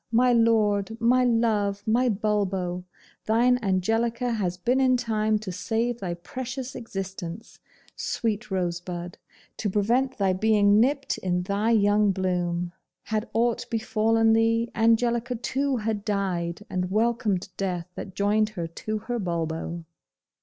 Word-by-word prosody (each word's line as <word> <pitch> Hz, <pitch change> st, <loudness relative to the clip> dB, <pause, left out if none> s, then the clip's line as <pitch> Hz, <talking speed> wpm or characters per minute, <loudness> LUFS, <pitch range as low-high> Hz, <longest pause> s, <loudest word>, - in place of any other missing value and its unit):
my 245 Hz, +2 st, +4 dB
lord! 220 Hz, -2 st, +2 dB
my 245 Hz, +2 st, +4 dB
love! 215 Hz, -4 st, +1 dB
my 245 Hz, +3 st, +2 dB
Bulbo! 195 Hz, -4 st, -1 dB, 0.4 s
Thine 245 Hz, +3 st, +3 dB
Angelica 225 Hz, +5 st, 0 dB
has 185 Hz, -6 st, -1 dB
been 245 Hz, +9 st, +1 dB
in 255 Hz, -1 st, +4 dB
time 220 Hz, -3 st, +1 dB
to 210 Hz, -3 st, -6 dB
save 225 Hz, +6 st, -1 dB
thy 175 Hz, -3 st, -3 dB
precious 255 Hz, +8 st, -6 dB
existence, 195 Hz, -3 st, -7 dB, 0.4 s
sweet 220 Hz, -1 st, -2 dB
rosebud; 175 Hz, -1 st, -3 dB, 0.4 s
to 210 Hz, -, -1 dB
prevent 240 Hz, +7 st, +1 dB
thy 195 Hz, -2 st, +2 dB
being 205 Hz, +1 st, +4 dB
nipped 275 Hz, +4 st, +1 dB
in 180 Hz, -1 st, -1 dB
thy 200 Hz, +4 st, 0 dB
young 205 Hz, -2 st, +4 dB
bloom! 175 Hz, -2 st, -1 dB, 0.3 s
Had 220 Hz, 0 st, -2 dB
aught 235 Hz, +1 st, +1 dB
befallen 225 Hz, 0 st, +2 dB
thee, 230 Hz, +1 st, +2 dB
Angelica 235 Hz, +2 st, +2 dB
too 265 Hz, +3 st, -1 dB
had 215 Hz, -2 st, -2 dB
died, 195 Hz, -3 st, -2 dB
and 180 Hz, 0 st, -2 dB
welcomed 215 Hz, -3 st, 0 dB
death 180 Hz, -3 st, -2 dB
that 190 Hz, -, -8 dB
joined 210 Hz, +1 st, +2 dB
her 170 Hz, -, -2 dB
to 215 Hz, +6 st, -4 dB
her 245 Hz, -1 st, -2 dB
Bulbo. 170 Hz, -2 st, -3 dB
215 Hz, 130 wpm, -26 LUFS, 185-230 Hz, 0.4 s, my